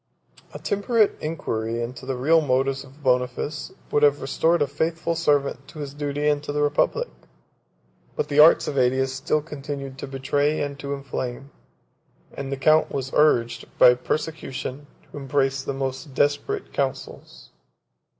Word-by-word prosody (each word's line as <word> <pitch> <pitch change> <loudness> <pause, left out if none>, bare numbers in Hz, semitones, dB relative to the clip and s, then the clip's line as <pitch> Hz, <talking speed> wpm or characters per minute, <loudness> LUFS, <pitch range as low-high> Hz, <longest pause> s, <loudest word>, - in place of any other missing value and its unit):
A - - -7
temperate 210 +1 +1
inquiry 115 -8 -3
into 125 +2 -6
the 135 - -1
real 155 +6 +4
motives 135 -1 0
of 140 +2 -17
Boniface 125 +3 0 0.2
would 145 - +2
have 145 -1 +4
restored 160 +4 +2
a - - +1
faithful 160 +4 -1
servant 140 -4 0
to - - -13
his 145 -2 -6
duty 145 0 -2
and 145 -1 +2
to 145 - -4
the 150 0 0
republic; 145 0 +1 1.1
but - - -1
the 145 - +1
arts 155 +2 +7
of 140 - -3
Ætius 130 +1 +2
still 135 +3 -1
continued 140 -3 -6
to - - -5
betray 145 +3 0
and 140 -1 -3
to 140 0 -3
inflame, 135 -1 -5 0.8
and 135 0 -6
the 140 - -2
count 155 +4 +4
was 135 -1 -4
urged, 120 -6 +3
by 125 - +8
persecution, 145 0 -4 0.2
to - - -9
embrace 135 0 0
the - - -4
most 135 +1 -4
desperate 145 - 0
counsels. - - -4
140 Hz, 155 wpm, -24 LUFS, 135-150 Hz, 1.1 s, by